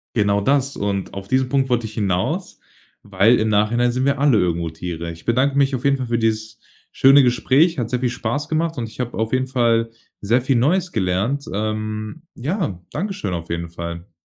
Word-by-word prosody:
Genau 100 -2 +2
das. 140 +4 +1
Und 100 -1 -3
auf 100 0 -7
diesen 130 +3 +1
Punkt 135 -1 +1
wollte 120 -2 +1
ich 110 - -7
hinaus, 95 -4 -2 0.4
weil 105 +4 +3
im 110 - +1
Nachhinein 110 +4 +2
sind 130 +2 -1
wir 140 -1 +1
alle 140 -5 +4
irgendwo 85 -3 0
Tiere. 85 0 -5
Ich 85 0 -12
bedanke 130 +4 +1
mich 140 -1 +3
auf 130 +1 -3
jeden 140 0 +3
Fall 130 -2 -4
für 120 0 0
dieses 110 -1 -1 0.3
schöne 135 +1 +6
Gespräch. 135 +7 +3
Hat 115 -2 -2
sehr 125 -1 -1
viel 125 - +1
Spaß 125 +5 -3
gemacht 165 0 -1
und 115 -2 -3
ich - - -16
habe 125 -1 -3
auf 110 0 -1
jeden 130 0 0
Fall 115 -3 +1 0.3
sehr 115 +5 +1
viel 130 0 +1
Neues 175 +9 +1
gelernt. 105 +8 -1
Ähm, 110 +5 -3
ja, 145 - -3
Dankeschön 170 - -3
auf 85 -1 -5
jeden 85 0 -3
Fall. 85 +2 -7
115 Hz, 200 wpm, -21 LUFS, 100-135 Hz, 0.4 s, schöne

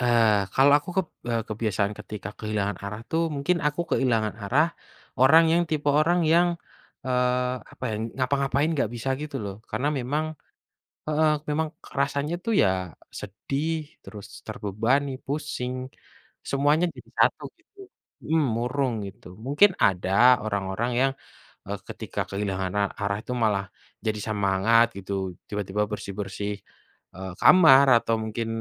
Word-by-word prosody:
Eee, 115 -4 +4 0.2
Kalau 140 +2 +6
aku 150 - -15
keb 190 -3 +2 0.2
e - - 0 0.2
kebiasaan 105 -2 -1
ketika 105 -3 -7
kehilangan 105 -2 -2
arah 105 +2 -5
tuh 165 +1 +1
mungkin 155 +6 +1
aku 150 +3 0
kehilangan 115 -5 +1
arah 140 +11 +3 0.5
orang 155 +6 +7
yang 170 +1 +4
tipe 150 -2 0
orang 175 +3 +3
yang, 175 +1 +5 0.6
eee, 125 0 +1 0.2
apa - - -8
ya - - -2 0.2
ngapa-ngapain 140 +2 +1
nggak 125 -6 0
bisa 120 +2 -4
gitu 150 -2 -5
loh 100 -1 -5 0.2
karena 125 +7 -1
memang 145 +5 -1 0.8
heeh, 155 0 +3 0.2
memang 155 +1 0 0.2
kerasanya 140 +3 -1
tuh 230 - 0
ya 95 - +4 0.5
sedih 135 - -3 0.3
terus 105 -2 -10 0.2
terbebani, 115 +8 0 0.2
pusing 135 -3 -3 0.8
semuanya 145 +5 +3
jadi - - -13
satu - - +3 0.2
gitu, 410 - -35 0.5
mhm, 160 0 +2
murung 125 +1 0
gitu 100 - -12 0.2
mungkin 145 +9 +5
ada 95 0 +1 0.3
orang-orang 100 +2 -2
yang, 135 0 +3 0.6
eee, - - -3
ketika - - -5
kehilangan 95 -2 -2
a - - +3 0.2
arah 100 0 0
itu - - -7
malah 100 -2 +1 0.4
jadi 110 -1 -1
semangat 105 +2 +3
gitu 100 0 -5 0.4
tiba-tiba 105 0 -1
bersih-bersih, 100 0 -4 0.6
eee, 95 0 -6
kamar 140 -7 +8
atau 115 0 0
mungkin 110 +1 -3
125 Hz, 135 wpm, -25 LUFS, 105-145 Hz, 0.8 s, kamar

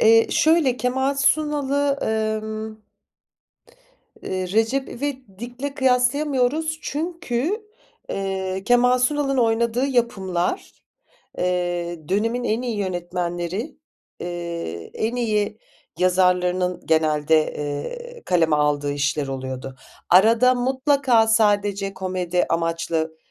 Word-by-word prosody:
Eee, 225 +1 +6
şöyle, 310 -6 +3
Kemal 265 +3 0
Sunal'ı, 285 -1 +1
emm 220 0 -2 1.6
ııı, 185 -1 -2
Recep 225 +7 +1
İvedik'le 255 0 -6
kıyaslayamıyoruz 275 +4 +1
çünkü, 335 - -2 0.5
eee, 190 -1 -3
Kemal 250 +1 +4
Sunal'ın 275 +1 +1
oynadığı 235 +2 +2
yapımlar, 200 - -1 0.7
eee, 175 -3 -2
dönemin 225 +5 0
en 225 +1 0
iyi 240 -4 -3
yönetmenleri, 180 - -3 0.4
eee, 170 - -5
en 225 +3 -2
iyi 215 -3 0 0.4
yazarlarının 180 0 +2
genelde, 155 -1 +2
eee, 475 - -5
kaleme 165 -4 +3
aldığı 145 -1 +1
işler 145 0 -1
oluyordu. 130 0 -5 0.3
Arada 225 +7 +6
mutlaka 260 -2 +2
sadece 205 -3 +2
komedi 185 -2 -1
amaçlı 165 -1 -1
215 Hz, 90 wpm, -22 LUFS, 175-255 Hz, 1.6 s, Eee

